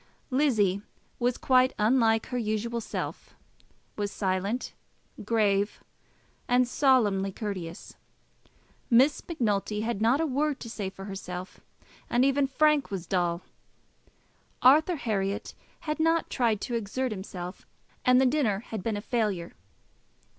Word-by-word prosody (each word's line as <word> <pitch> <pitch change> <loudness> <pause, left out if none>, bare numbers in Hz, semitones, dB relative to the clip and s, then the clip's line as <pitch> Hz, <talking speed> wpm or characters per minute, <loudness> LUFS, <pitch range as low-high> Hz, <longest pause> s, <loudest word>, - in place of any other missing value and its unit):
Lizzie 220 -9 +2 0.4
was 245 0 +1
quite 255 0 +3
unlike 225 0 +3
her 250 - -2
usual 230 +1 -2
self, - - -6 0.6
was 205 -1 -2
silent, 195 +5 -2 0.5
grave, 205 -2 +1 0.6
and 250 0 +3
solemnly 220 -8 +2
courteous; 185 -5 -6 0.9
Miss 260 +4 +4
Macnulty 210 - -1
had 225 -2 -2
not 235 +6 +3
a 325 - +2
word 290 0 0
to 230 - -7
say 200 -4 -3
for 195 0 -10
herself; 185 -2 -7 0.5
and 245 +2 +3
even 275 0 +2
Frank 300 +1 +2
was 190 -3 -4
dull. 175 -1 0 1.2
Arthur 310 +7 +6
Herriot 200 -7 -2 0.3
had 305 0 -3
not 325 +1 +2
tried 225 -5 +1
to 245 - -4
exert 235 +3 -2
himself, 185 -2 -7 0.4
and 250 0 +5
the 265 - +4
dinner 250 -7 +1
had 220 -3 -6
been 215 +1 -2
a - - -4
failure. 210 -7 -1
225 Hz, 125 wpm, -28 LUFS, 195-260 Hz, 1.2 s, Arthur